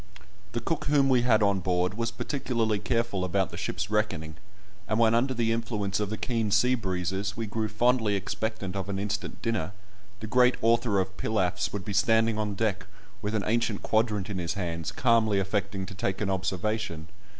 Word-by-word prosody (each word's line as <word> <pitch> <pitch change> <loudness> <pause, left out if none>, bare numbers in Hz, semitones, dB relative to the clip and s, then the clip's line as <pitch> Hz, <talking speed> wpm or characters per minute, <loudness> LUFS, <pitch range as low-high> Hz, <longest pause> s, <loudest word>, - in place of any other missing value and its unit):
The 120 - 0
cook 155 +6 -2
whom 140 -1 +3
we 125 -2 +4
had 115 -3 +4
on 100 -1 +3
board 90 +1 0
was 115 +2 -1
particularly 115 -5 -1
careful 115 -4 0
about 95 +1 0
the - - -7
ship's - - -3
reckoning, 85 -8 -1 0.5
and 110 - 0
when 115 -1 +4
under 130 +3 +2
the 115 -1 +1
influence 110 -4 -1
of 105 -2 -1
the 110 - -3
keen 115 -3 -1
sea 115 +5 +4
breezes 95 -1 -2
we 115 - -2
grew 110 +1 -2
fondly 110 0 +2
expectant 100 0 -3
of 95 0 -3
an 100 - -2
instant 105 +1 -4
dinner, 105 -6 -1 0.5
the 110 - -6
great 125 +3 +4
author 115 -3 +3
of 95 0 -2
pilafs 95 -5 0
would 100 -2 -5
be 105 - -3
standing 110 +2 +3
on 105 -1 -1
deck 100 -2 -1 0.3
with 105 +1 -2
an 105 - 0
ancient 115 -2 0
quadrant 110 -3 +1
in 100 -3 -3
his 85 +2 -2
hands, 85 -4 -3
calmly 115 -5 +3
affecting 100 0 -1
to 100 - -8
take 95 0 -2
an 100 -2 0
observation. 95 -2 -2
105 Hz, 190 wpm, -28 LUFS, 95-115 Hz, 0.5 s, we